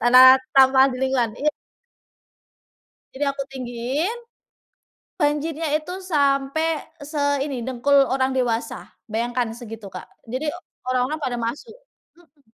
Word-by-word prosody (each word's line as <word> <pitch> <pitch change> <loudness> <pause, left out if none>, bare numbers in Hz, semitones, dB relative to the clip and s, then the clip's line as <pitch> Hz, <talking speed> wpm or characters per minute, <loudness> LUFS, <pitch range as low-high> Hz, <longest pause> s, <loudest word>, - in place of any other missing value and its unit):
Tanah 255 +2 +8 0.2
sampah 265 0 +7
di - - -5
lingkungan 250 -4 0
iya. 300 +1 +1 1.6
Jadi, 280 +2 -1
aku 280 0 -1
tinggiin. 265 - -3 1.0
Banjirnya 305 +2 0
itu 310 +4 -8
sampai 295 -1 +1 0.2
seini 285 -2 -1
dengkul 260 +2 +1 0.2
orang 265 0 +1
dewasa, 235 -3 -2 0.2
bayangkan 235 +1 -2
segitu, 225 -2 -9
Kak, 185 - -8 0.2
jadi 260 +6 -3 0.4
orang-orang 255 +5 0
pada 250 -4 -2
masuk 240 - -4 0.5
mhm. 320 -4 -25
265 Hz, 110 wpm, -23 LUFS, 245-295 Hz, 1.6 s, Tanah